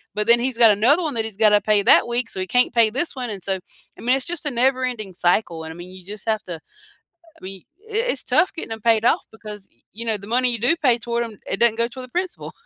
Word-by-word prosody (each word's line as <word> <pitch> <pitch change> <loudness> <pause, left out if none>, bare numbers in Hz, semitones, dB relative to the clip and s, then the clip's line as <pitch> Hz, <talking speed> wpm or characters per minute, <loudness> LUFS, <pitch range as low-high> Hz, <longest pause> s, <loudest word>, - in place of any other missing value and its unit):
but 210 +1 -1
then 235 0 +7
he's 250 -1 -2
got 220 - +8
another 285 +11 +3
one 295 -6 -3
that 225 -1 -2
he's 215 -3 -8
gotta 210 -1 +5
pay 210 -1 +4
that - - +5
week, 240 0 -2
so 190 - -5
he 185 - -3
can't 250 - +4
pay 220 -1 +5
this 275 +5 -2
one, 250 -3 -5
and 195 -3 -8
so" 195 - -1 0.4
I - - -13
mean, 250 +3 +3
it's 270 - -3
just 320 - -6
a 295 - -1
never 255 +2 +2
ending 215 -7 -5
cycle, 175 -2 0
and, 160 - -7
I - - -14
mean, 175 +1 -10
you 185 -1 -13
just 210 +2 -10
have 215 -1 -1
to 175 -2 -6
I 160 - -19 0.6
mean, 190 -1 -8 0.3
i - - -9 0.2
it's - - -5
tough 370 - +2
getting 325 - -7
them 220 -1 -6
paid 225 -1 +2
off - - +2
because, 210 -2 -10 0.3
you 230 +2 -5
know, 220 -2 +1
the 200 - -12
money 255 -1 +2
you 230 - -2
do 275 +8 +3
pay 250 -7 +2
toward 235 0 -2
them, 220 -3 -10
it 195 - -1
doesn't 235 -2 +4
go 235 - 0
toward 255 +1 -9
the - - -26
principal. 370 -1 -5
230 Hz, 285 wpm, -21 LUFS, 205-250 Hz, 0.6 s, got